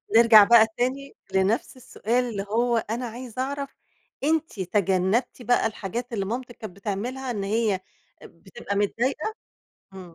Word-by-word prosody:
نرجع 225 -2 +9
بقى 225 0 +6
تاني 265 +3 -2 0.2
لنفس 195 +7 +1
السؤال 245 0 -1
اللي 200 -3 -4
هو: 235 +2 +2
أنا 230 +3 -3
عايزة 245 +1 -6
اعرف 280 +1 -4 0.5
أنتِ 315 -5 0
تجنبتِ 190 +6 0
بقى 245 +1 +2
الحاجات 230 +3 -5
اللي 195 -3 -1
مامتِك 240 +3 -5
كانت 215 -6 -9
بتعملها، 235 +6 -4
إن 205 -4 -3
هي 210 -1 0 0.4
بتبقى 195 +5 -8
متضايقة؟ 245 - -1 0.6
إمم 185 -3 -11
230 Hz, 135 wpm, -25 LUFS, 200-250 Hz, 0.6 s, نرجع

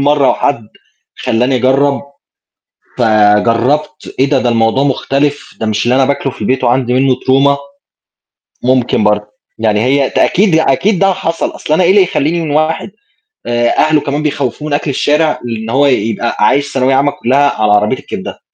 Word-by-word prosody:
مرّة 145 -1 +2
وحَد 130 -7 -1 0.5
خلّاني 125 +3 0
أجرّب 135 +3 +1 1.0
فجرّبت 115 +7 +1
إيه 135 - +3
ده! 140 - +2
ده 125 - 0
الموضوع 115 +3 +1
مختلف، 140 +1 -2
ده 110 - -2
مش 105 -1 -1
اللي 120 +1 +1
أنا 135 0 +3
باكله 140 -1 -2
في - - -15
البيت 130 0 -1
وعندي 125 0 +1
منه 130 0 +2
Trauma. 135 +2 +1 1.1
ممكن 125 -3 +1
برضه، 105 0 +1 0.3
يعني 110 -2 +1
هي 135 +4 +1
ت - - -6
أكيد 195 -2 +2
ي 160 - +4
أكيد 175 +8 +1
ده 195 -1 +3
حصل، 165 -3 -3
أصل 150 - -3
أنا 180 +4 +3
إيه 175 - +2
اللي 195 +1 +5
يخلّيني 170 0 -1
من 155 -3 -3
واحد 155 +5 -1 0.5
آآ 120 0 0
أهله 155 -1 +3
كمان 145 +2 -3
بيخوّفوه 145 0 -3
من 145 - -3
أكل 145 +1 -1
الشارع 150 +3 0
لإن 115 -1 -5
هو 140 +4 +2
يبقى 115 -3 -1
عايش 140 +6 +1
ثانوية 135 0 +1
عامّة 140 +2 +2
كلّها 140 -1 0
على 105 -1 +2
عربية 105 +5 +2
الكبدة؟ - - -8
135 Hz, 175 wpm, -13 LUFS, 120-145 Hz, 1.1 s, اللي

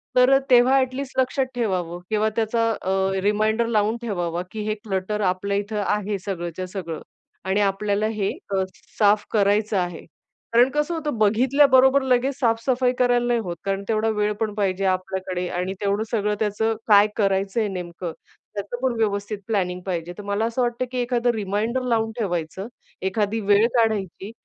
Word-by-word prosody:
तर 255 +2 +6
तेव्हा 250 +1 +6
ॲटलीस्ट 260 +1 -3
लक्षात 260 +1 +1
ठेवावं 180 -7 -1
किंवा 215 0 +1
त्याचा 230 0 +1
अ, 190 0 0
रिमाइंडर 215 +3 +2
लावून 220 0 +1
ठेवावा, 175 -6 -2
की 215 - -5
हे 215 - 0
क्लटर 205 0 -2
आपल्या 200 +2 -2
इथं 205 +1 -2
आहे 210 0 0
सगळंच्या 185 -2 -5
सगळं 175 -4 -6 0.4
आणि 190 +2 +1
आपल्याला 205 +1 +1
हे 210 -3 -1 0.2
अ, 190 -1 +1 0.4
साफ 205 -1 +4
करायचं 205 0 +2
आहे. 175 -2 -3 0.5
कारण 240 +2 +6
कसं 300 +3 0
होतं, 300 -6 -3
बघितल्या 245 +7 +4
बरोबर 265 +1 +5
लगेच 260 +1 +1
साफ-सफाई 250 +1 +1
करायला 245 -1 +3
नाही 240 -1 +2
होत. 175 -3 -4
कारण 195 0 -1
तेवढा 225 0 +1
वेळ 210 -1 0
पण 220 -2 -1
पाहिजे 195 -2 0
आपल्याकडे 185 -1 -3
आणि 180 +2 -2
तेवढं 200 +1 0
सगळं 210 -2 0
त्याचं 220 +1 0
काय 205 -1 +7
करायचंय 195 +1 +1
नेमकं 175 -3 -5 0.4
त्याचं 205 +4 -4
पण 260 -2 +1
व्यवस्थित 205 -1 -1
प्लॅनिंग 180 -5 -1
पाहिजे. 175 -2 -3
तर 205 - -7
मला 200 +2 -1
असं 235 +2 -1
वाटतं, 240 +1 0
की 255 - -4
एखादं 245 0 +1
रिमाइंडर 215 +4 -1
लावून 225 -2 +1
ठेवायचं. 180 -1 -3 0.3
एखादी 205 +3 0
वेळ 205 +1 +4
काढायची 215 -4 0
210 Hz, 160 wpm, -23 LUFS, 195-235 Hz, 0.5 s, काय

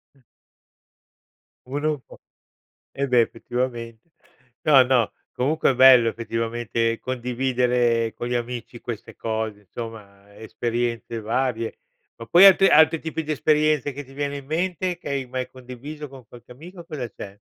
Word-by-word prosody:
Mh. 135 - -26 1.5
Uno 145 +4 -2
è - - +3
un 150 -3 -5
po' - - -15 0.7
eh 140 0 -2
beh, 125 -2 +4
effettivamente. 120 +3 -4 0.5
No, 145 -5 +7
no. 125 -3 +2 0.2
Comunque 140 +4 +1
è - - -3
bello 125 -2 +7
effettivamente 115 0 -2
condividere 125 -2 0
con 120 +2 -5
gli 125 - -1
amici 120 0 -5
queste 115 -3 -7
cose. 110 -2 -3
Insomma 100 -1 -10
esperienze 115 +1 -3
varie. 115 0 -2 0.4
Ma 115 - -8
poi, 175 +8 +8
altri 195 0 +8
altri 160 -1 +5
tipi 160 0 -4
di 155 - -4
esperienze 150 -1 +2
che 145 +2 -7
ti 135 0 -16
viene 145 0 -3
in 140 - -10
mente 175 +3 -2
che 170 - -8
hai 140 -1 -2
mai 125 0 -4
condiviso 130 +4 -9
con 130 -4 -14
qualche 120 0 -15
amico, 170 +8 -11
cosa 140 -8 -5
c'è? 100 0 -10
125 Hz, 150 wpm, -23 LUFS, 115-145 Hz, 1.5 s, poi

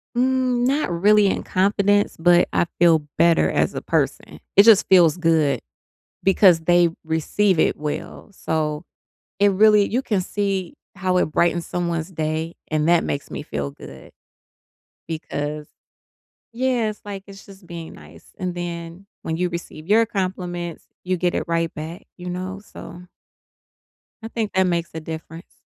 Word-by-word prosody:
Mm, 255 -1 +1
not 275 0 +1
really 205 +4 +4
in - - -1
confidence, 200 +2 +1
but 175 +1 +4
I - - +2
feel 170 -2 +5 0.2
better 170 0 +4
as - - +1
a - - -4
person, - - -2 0.2
it 200 - +8
just 215 -2 +6
feels 175 -4 +5
good, 160 -6 +2 0.6
because 185 -3 +5
they 175 +1 +4
receive 160 +4 +1
it - - +2
well. 150 +7 -6
So, 155 -4 -2 0.6
it 200 0 +4
really 210 +1 +5
you 250 +4 -1
can 210 -7 0
see 195 -1 -2 0.2
how 185 -1 -1
it - - +2
brightens 170 +2 0
someone's 170 0 -3
day, 160 0 -3
and 155 0 0
that 170 -1 +4
makes 140 - -4
me - - -5
feel 70 -1 -4
good, - - -13 1.0
because 150 -2 -4 0.9
yeah, 245 -2 0
it's 215 - -9
like 195 -1 -7
it's 195 0 -13
just 195 -2 -16
being 170 -1 -8
nice. - - -16
And 180 -2 -3
then, 170 +1 -6 0.2
when 160 0 -3
you 180 0 0
receive 170 -1 -8
your 225 +2 +4
compliments, 180 -5 -4 0.2
you 185 0 -1
get 175 0 0
it - - 0
right 165 0 -1
back, 160 +3 -7
you 180 0 -7
know? 185 +2 -5
So 175 -2 -11 1.2
I - - -4
think 225 -3 -3
that 190 - +3
makes 170 -2 -1
a 160 - -5
difference. 160 +1 -9
175 Hz, 155 wpm, -22 LUFS, 165-200 Hz, 1.2 s, it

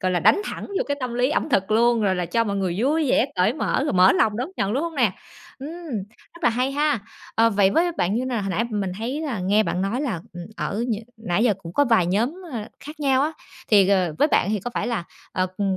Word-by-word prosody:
gọi 185 0 0
là, 175 - +1
đánh 405 - +5
thẳng - - -5
vô 400 - -2
cái 285 - 0
tâm 250 -2 -3
lý 250 +2 +2
ẩm 310 - 0
thực 195 -6 +1
luôn, 235 +1 +3
gọi 195 -3 +2
là, 180 -1 -2
cho 230 +7 +1
mọi 200 -2 -2
người 185 -2 -1
vui 295 +5 +1
vẻ 255 - +3
cởi 185 +5 +3
mở, 285 - -1
rồi 295 - -1
mở 185 +1 +6
lòng 215 -1 +2
đón 250 +7 -2
nhận, 195 +1 0
đúng 275 +7 0
hông 335 -1 -4
nè? 240 -9 +2 0.5
Ừm! 275 +3 -6 0.7
Rất 340 - -15
là - - +6
hay 250 +4 0
ha. 295 -4 +1 0.3
Ờ, 230 0 +4
vậy 200 -2 +3
với 345 - +2
bạn 195 - 0
như 245 +3 0
nào? 245 -5 -2
Hồi 195 - -3
nãy 205 +6 0
mình 200 -3 -2
thấy 255 +7 -3
là 265 -11 -3
nghe 205 +4 +3
bạn 185 -2 -2
nói 220 +7 -1
là, 235 - -2
ừm, 175 0 -7
ở 225 +4 -2
nh 225 - +1 0.2
nãy 220 -1 0
giờ 215 -5 +3
cũng 165 - -8
có 285 - +3
vài 225 -8 +3
nhóm, 225 - 0 0.2
ờ, 225 -3 -5
khác 300 +1 -10
nhau 270 -2 +3
á, 310 +2 0 0.4
thì, 200 -3 +5
ờ, 185 -5 +2
với 295 - +4
bạn 200 - +2
thì 215 -2 0
có 245 - -5
phải 210 - -1
là, 230 -8 -2 0.3
ờ, 185 0 0
ừm, 195 -2 0
225 Hz, 270 wpm, -23 LUFS, 195-265 Hz, 0.7 s, mở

